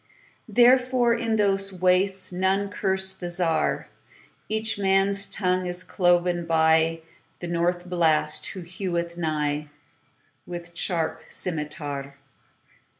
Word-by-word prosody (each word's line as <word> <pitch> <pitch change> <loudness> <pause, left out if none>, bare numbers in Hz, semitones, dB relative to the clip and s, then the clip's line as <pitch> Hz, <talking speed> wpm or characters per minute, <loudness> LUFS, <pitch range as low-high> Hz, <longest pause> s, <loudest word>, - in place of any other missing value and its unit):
Therefore, 245 +1 +4
in 230 -1 0
those 195 -2 +1
wastesNone 190 +1 +1
curse 190 -1 0
the 175 -2 -6
Czar.Each 200 +5 -3
man's 195 0 +2
tongue 185 -1 0
is 180 +1 -2
cloven 175 -2 +1
byThe 160 0 +3 0.4
North 175 +1 -1
Blast, 165 -4 +1
who 190 - -7
heweth 170 -1 -4
nighWith 150 +2 -6
sharp 165 -2 -2
scymitar. 145 -4 -3
180 Hz, 90 wpm, -25 LUFS, 165-195 Hz, 0.4 s, Therefore